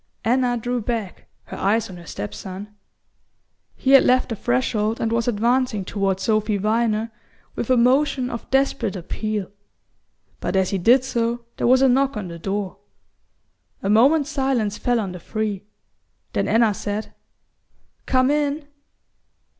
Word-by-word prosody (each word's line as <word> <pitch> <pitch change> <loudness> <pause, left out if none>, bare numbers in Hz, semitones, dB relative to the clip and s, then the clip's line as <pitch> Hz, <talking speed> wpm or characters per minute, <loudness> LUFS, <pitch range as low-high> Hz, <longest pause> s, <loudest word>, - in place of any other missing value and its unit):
Anna 245 +1 +2
drew 245 +1 -2
back, 220 -4 -4 0.2
her - - -9
eyes 220 +3 +1
on 185 - -10
her 170 -1 -13
step 105 -5 -5
son. 190 - -8 1.0
He 265 - 0
had 275 - +8
left 255 +1 +3
the 225 - -2
threshold 210 - 0
and 225 - -1
was 230 0 0
advancing 235 -2 +1
toward 195 -1 -1
Sophy 215 0 +1
Viner 220 +2 0 0.4
with 235 - -4
a 255 - +4
motion 260 +1 +2
of 235 - -7
desperate 270 -6 +1
appeal; 205 +2 -4 0.9
but - - -3
as 190 -1 +2
he 195 - 0
did 245 +8 +5
so 235 -1 -2
there - - 0
was 260 +2 +5
a - - +6
knock 270 0 +2
on 195 -4 -5
the 170 0 -8
door. 195 +1 -3 1.0
A 195 - +1
moment's 280 +7 +4
silence 265 -7 0
fell 245 -1 +1
on 200 -4 -3
the 180 - -8
three; 210 +1 -3 0.7
then - - 0
Anna 225 -2 +3
said: 205 +2 -4 0.9
"Come 255 +1 +3
in!" 295 0 -1
225 Hz, 155 wpm, -22 LUFS, 205-255 Hz, 1.0 s, had